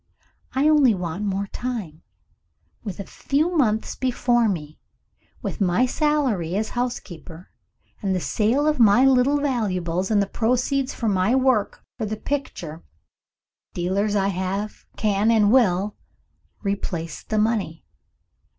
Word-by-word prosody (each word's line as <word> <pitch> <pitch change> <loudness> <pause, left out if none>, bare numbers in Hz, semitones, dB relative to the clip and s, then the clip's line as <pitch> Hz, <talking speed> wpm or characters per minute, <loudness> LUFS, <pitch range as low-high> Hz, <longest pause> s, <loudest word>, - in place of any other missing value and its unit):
I 275 +3 +3
only 290 -7 +5
want 180 +2 -4
more 200 0 -1
time. 200 -9 -5 0.8
With 200 -5 -6
a - - -3
few 310 +6 -1
months 220 -8 +1
before 245 -2 +1
me 155 -5 -5 0.6
with - - -4
my 190 +6 +3
salary 255 - 0
as 215 +2 -1
housekeeper, 185 -8 -5 0.5
and 195 -3 0
the - - 0
sale 235 - +1
of 305 -2 +1
my 230 +3 +6
little 270 +2 +4
valuables, 190 -10 -1
and 215 -2 +3
the 200 - +2
proceeds 255 +6 0
of 230 - -2
my 195 +6 +2
work 255 -6 +1 0.2
for 220 - -2
the 215 +1 -3
picture 180 - -5 0.9
dealers 195 +4 0
I 200 0 +2 0.7
can, 210 0 +1
and 215 -3 +4
will, 205 -5 +3 0.7
replace 180 -5 -3
the 215 - -3
money. 210 - 0
215 Hz, 130 wpm, -23 LUFS, 190-255 Hz, 0.9 s, my